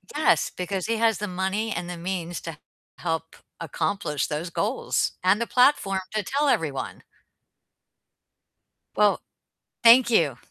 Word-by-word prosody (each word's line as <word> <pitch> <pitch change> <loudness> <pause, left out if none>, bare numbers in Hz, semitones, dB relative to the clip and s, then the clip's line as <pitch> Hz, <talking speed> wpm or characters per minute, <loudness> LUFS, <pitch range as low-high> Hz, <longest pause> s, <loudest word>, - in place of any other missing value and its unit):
Yes, 310 - +2
because 185 0 -3
he 230 - 0
has 225 0 +2
the 210 - -3
money 190 +4 -2
and 175 -2 -4
the 180 - -6
means 175 -1 -4
to 165 -3 -7 0.4
help 165 -1 -3 0.2
accomplish 160 -1 -2
those 155 +3 -4
goals, 215 +8 -1
and 190 +4 +3
the 235 - -2
platform 245 -7 +3
to 215 -1 -1
tell 285 +7 0
everyone. 150 - -2 1.9
Well, 210 -1 +4 0.7
thank 235 +1 +7
you. 150 - +2
190 Hz, 130 wpm, -25 LUFS, 165-225 Hz, 1.9 s, thank